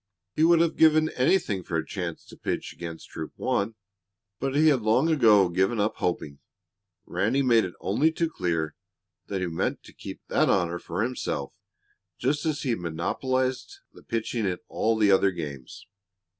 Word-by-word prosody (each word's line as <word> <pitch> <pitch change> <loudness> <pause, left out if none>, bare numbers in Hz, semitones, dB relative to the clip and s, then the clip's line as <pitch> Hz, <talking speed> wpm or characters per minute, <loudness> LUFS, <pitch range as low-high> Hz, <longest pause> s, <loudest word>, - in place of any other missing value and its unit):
He 155 - +2
would 165 0 +6
have 170 -1 +1
given 155 0 +5
anything 130 - +1
for 85 - -2
a 80 - -2
chance 90 -3 -5
to - - -13
pitch - - -4
against 85 -1 -8
Troop 80 - -7
One, 105 +3 -1 0.6
but 135 +1 -2
he 155 +2 +5
had 135 -5 +2
long 110 +9 +3
ago 110 - +5
given 95 +6 +1
up 105 +1 0
hoping, 75 -5 -2 0.7
Ranny 130 +7 0
made 115 -5 +4
it 90 - -7
only 140 +11 +2
too 165 +1 0
clear 85 - -2 0.5
that 95 -2 -3
he - - 0
meant 85 -2 -2
to - - -15
keep - - -9
that - - +2
honor 85 -2 +1
for 90 +6 -3
himself, 120 - -3 0.6
just 145 +5 0
as 155 -1 -1
he 130 - 0
had 115 - -1
monopolized 130 +10 -2 0.2
the - - -15
pitching 115 -1 -2
in 90 -1 -1
all 115 0 +1
the 105 -2 +4
other 95 0 +5
games. 75 -8 -7
110 Hz, 175 wpm, -26 LUFS, 85-135 Hz, 0.7 s, would